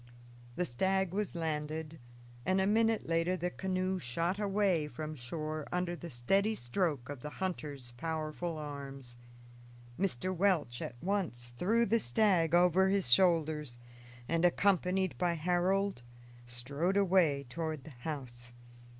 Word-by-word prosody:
The 180 - 0
stag 190 +6 0
was 205 -2 -2
landed, 155 -1 -3 0.4
and 185 +5 +2
a 190 - +3
minute 225 +2 +2
later 165 +2 +1
the 180 0 -2
canoe 185 0 -1
shot 170 +8 -1
away 195 -6 +1
from 155 +3 -5
shore 155 +4 -4
under 180 -1 -1
the 170 0 -8
steady 195 - +1
stroke 135 - -1
of 145 -2 -6
the 150 - -6
hunter's 150 -8 -4
powerful 160 +2 -3
arms. 140 -4 -7 0.8
Mr. 185 -1 -1
Welch 170 -10 +1
at 120 - -5
once 170 -12 -2
threw 225 - +2
the 230 +2 +3
stag 170 - +3
over 180 +2 +5
his 195 -9 +2
shoulders 155 -4 +3 0.5
and, 165 0 +1
accompanied 185 0 +2
by 175 -1 +2
Harold, 180 0 +1 0.5
strode 140 +11 -1
away 175 -8 +3
toward 155 +2 -4
the 155 - -11
house. 120 -5 -6
170 Hz, 135 wpm, -33 LUFS, 145-190 Hz, 0.8 s, over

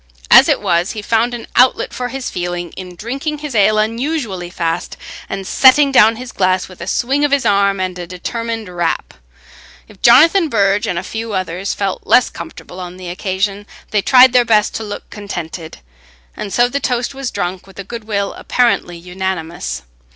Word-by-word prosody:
As - - +8
it - - +2
was, 170 +3 0
he 215 -2 -6
found 230 +3 +1
an 235 - -8
outlet 250 +1 +3
for 250 - -3
his 265 0 -5
feeling 175 -1 -4
in 180 -1 -9
drinking 270 - -4
his 295 -2 -6
ale 215 0 +3
unusually 225 - -2
fast, 170 0 -3 0.3
and 195 -1 -4
setting 275 +6 +5
down 225 -3 +5
his 250 +1 -8
glass 185 -1 +1
with 185 -2 -14
a 170 - -6
swing 270 +7 0
of 290 - +3
his 280 -1 +2
arm 200 -1 +2
and 185 -1 -3
a 175 - -6
determined 225 +4 -4
rap. 175 -2 -2 0.7
If 205 -3 -18
Jonathan 320 +8 +6
Burge 200 -3 +2
and 175 - -2
a 170 - -2
few 225 +2 -5
others 185 0 -3
felt 195 -2 -3
less 250 - +4
comfortable 170 +2 -10
on 180 0 -7
the 185 -1 -7
occasion, 195 +3 -2 0.2
they 210 - +2
tried 255 +2 +6
their 250 -1 +5
best 215 -2 +2
to 225 - -5
look 205 -1 -7
contented, 175 -5 -7 0.6
and 200 - -6
so 240 +3 +3
the 275 +3 -2
toast 245 -1 -1
was 270 -2 -4
drunk 185 -1 -4
with 195 - -17
a 200 - -5
goodwill 210 -2 -3
apparently 235 -8 0
unanimous. 170 - -4
205 Hz, 185 wpm, -17 LUFS, 180-240 Hz, 0.7 s, As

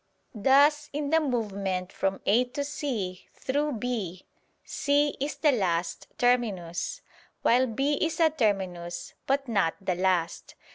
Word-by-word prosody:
Thus 285 +6 +4
in 290 0 -2
the 320 - +5
movement 200 - -2
from 195 0 -1
A 235 +5 +4
to 275 +3 -4
C 240 -11 -4
through 290 +2 -1
B, 215 -7 -3 0.4
C 290 0 +1
is 285 +2 -2
the 300 - +3
last 175 -7 -1
terminus, 205 -9 0 0.4
while 250 +2 +4
B 275 +5 0
is 325 0 -1
a 320 -2 +5
terminus, 185 - -2
but 275 0 +1
not 200 -8 +1
the 190 -2 -1
last. 180 -2 -1
240 Hz, 135 wpm, -27 LUFS, 185-285 Hz, 0.4 s, the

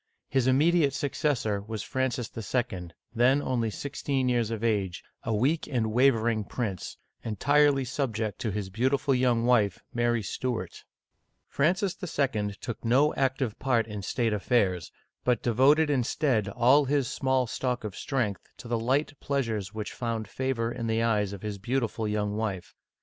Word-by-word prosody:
His 130 -2 +1
im 130 0 +4
mediate 155 -2 +3
successor 135 -8 0
was 110 0 -5
Francis 130 -3 -2
II., 110 -5 -2 0.3
then 125 +4 +4
only 125 -5 0
sixteen 135 +1 -2
years 120 -3 +1
of 115 -1 -4
age, 100 -6 0 0.2
a 115 - -3
weak 135 +9 +1
and 115 -6 -1
wavering 115 -3 +3
prince, 100 -4 -4 0.3
entirely 140 +4 +3
subject 115 -5 -2
to 115 - -2
his 100 -1 -4
beautiful 130 +6 +1
young 125 -2 +2
wife, 110 -6 +2
Mary 120 -1 +1
Stuart. 110 -2 -4 0.6
Francis 180 +6 +1
II. 120 - -1
took 120 - -6
no 135 +6 +3
active 130 -4 -1
part 120 -4 +2
in 105 -2 -6
state 115 +3 0
affairs, 95 -6 +1 0.3
but 125 -3 +1
de 120 - +1
voted 145 +6 +5
instead 125 -4 +1
all 130 +6 +4
his 140 -1 +1
small 130 0 +1
stock 125 +1 -2
of 105 -2 -5
strength 120 -8 -1 0.2
to - - -10
the 120 -1 0
light 135 +6 +1
pleasures 115 -8 -2
which 105 -1 -4
found 115 -3 -3
favor 120 0 -2
in 115 -1 -4
the 115 0 +1
eyes 105 -4 +1
of 100 0 -8
his 105 -2 -4
beautiful 115 0 -1
young 105 -1 -1
wife. 105 -5 -3
120 Hz, 160 wpm, -28 LUFS, 110-135 Hz, 0.6 s, voted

